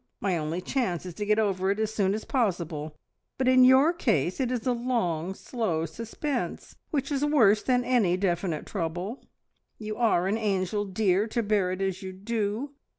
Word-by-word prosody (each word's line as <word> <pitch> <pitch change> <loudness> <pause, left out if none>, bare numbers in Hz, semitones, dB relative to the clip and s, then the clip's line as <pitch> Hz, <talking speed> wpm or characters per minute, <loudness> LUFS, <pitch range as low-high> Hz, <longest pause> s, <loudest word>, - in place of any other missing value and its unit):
My 195 -3 0
only 160 +2 -2
chance 185 -6 -1
is 180 - -6
to 205 +4 -5
get 210 0 +3
it - - +4
over 190 -2 0
as 215 +2 0
soon 200 -2 +1
as 215 - -6
possible, 170 - -2 0.4
but 260 - 0
in 255 0 +6
your 265 +6 +6
case 210 - 0
it 255 -2 0
is 245 -3 -2
a 255 - +2
long 190 -8 -1
slow 185 -12 -2
suspense, 240 - -4
which 280 -1 -2
is 280 0 0
worse 225 -9 +4
than 250 -1 +1
any 215 -9 +2
definite 175 -4 -1
trouble. 180 +6 -4 0.5
You 215 -1 -5
are 220 -7 +2
an 210 +3 0
angel, 205 -1 0
dear, 195 +1 +1
to 235 +1 -1
bear 205 -3 +1
it 185 +1 -2
as 190 -1 -2
you 190 -1 -6
do! 215 +6 -2
205 Hz, 185 wpm, -27 LUFS, 185-240 Hz, 0.5 s, in